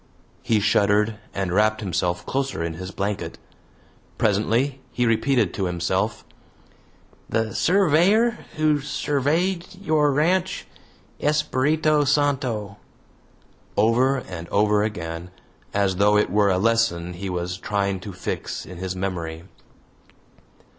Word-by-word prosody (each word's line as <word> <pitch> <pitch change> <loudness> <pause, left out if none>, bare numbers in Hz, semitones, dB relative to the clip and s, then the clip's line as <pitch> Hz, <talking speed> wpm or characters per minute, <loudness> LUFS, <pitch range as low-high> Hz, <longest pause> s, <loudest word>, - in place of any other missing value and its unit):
He 115 -4 +2
shuddered 105 +1 +2
and 95 -2 -2
wrapped 110 +2 +3
himself 90 -2 -1
closer 135 -9 -2
in 85 -1 -3
his 90 +3 -7
blanket. 100 +1 -3 0.8
Presently 115 +6 +1
he 125 - 0
repeated 115 -3 +2
to 95 - -2
himself 85 -2 -1 1.0
"The 110 0 0
surveyor 195 +6 +3 0.2
who 155 -1 +2
surveyed 150 +5 0
your 155 -6 +2
ranch 175 +6 +1 0.6
Espiritu 150 0 +2
Santo" 130 -8 0 1.0
over 125 +6 +3
and 90 -8 -7
over 105 0 +3
again, 85 -5 -4 0.4
as 100 -2 +1
though 105 +1 +4
it 105 - +1
were 100 0 +3
a 95 - +2
lesson 95 -5 +1
he 95 +2 -5
was 90 +1 -3
trying 100 -2 -1
to 100 +2 -8
fix 90 - -5
in 90 - -10
his 95 0 -3
memory. 85 -4 -4
105 Hz, 115 wpm, -23 LUFS, 95-145 Hz, 1.0 s, though